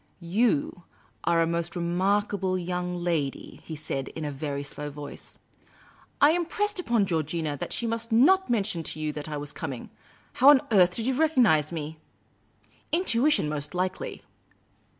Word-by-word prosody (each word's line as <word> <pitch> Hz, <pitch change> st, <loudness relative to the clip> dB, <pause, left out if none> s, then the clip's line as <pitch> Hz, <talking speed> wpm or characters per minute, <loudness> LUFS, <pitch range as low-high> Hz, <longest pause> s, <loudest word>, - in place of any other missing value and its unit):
" -, -, -39 dB
You 180 Hz, -2 st, 0 dB, 0.4 s
are 170 Hz, -1 st, +3 dB
a -, -, +2 dB
most 170 Hz, +2 st, -2 dB
remarkable 190 Hz, +2 st, 0 dB
young 180 Hz, 0 st, -3 dB
lady," 170 Hz, -6 st, -3 dB
he 160 Hz, -, -6 dB
said, 135 Hz, -3 st, -4 dB
in 160 Hz, -, -6 dB
a 145 Hz, -, -2 dB
very 140 Hz, 0 st, -4 dB
slow 145 Hz, +1 st, -6 dB
voice. 145 Hz, 0 st, -9 dB, 0.4 s
" -, -, -26 dB, 0.3 s
I 290 Hz, -, +7 dB
impressed 365 Hz, +4 st, 0 dB
upon 235 Hz, -, +2 dB
Georgina 160 Hz, -3 st, -1 dB
that -, -, -5 dB
she 235 Hz, -, -1 dB
must 230 Hz, 0 st, -2 dB
not 340 Hz, +12 st, +5 dB
mention 210 Hz, -7 st, 0 dB
to 155 Hz, -, -4 dB
you 155 Hz, -1 st, -2 dB
that 150 Hz, +1 st, -6 dB
I 150 Hz, -, -3 dB
was 145 Hz, 0 st, -4 dB
com 145 Hz, -1 st, -5 dB
ing. 125 Hz, -, -9 dB, 0.4 s
How 265 Hz, +3 st, +6 dB
on 285 Hz, -3 st, +7 dB
earth 180 Hz, -4 st, +5 dB
did 225 Hz, -, -2 dB
you 265 Hz, -, +1 dB
recognise 245 Hz, -, +3 dB
me? 155 Hz, -1 st, -5 dB, 0.3 s
" -, -, -39 dB
" -, -, -33 dB
Intuition, 300 Hz, -, +2 dB
most 150 Hz, +2 st, -4 dB
likely." 185 Hz, +1 st, -3 dB
175 Hz, 175 wpm, -27 LUFS, 155-230 Hz, 0.4 s, I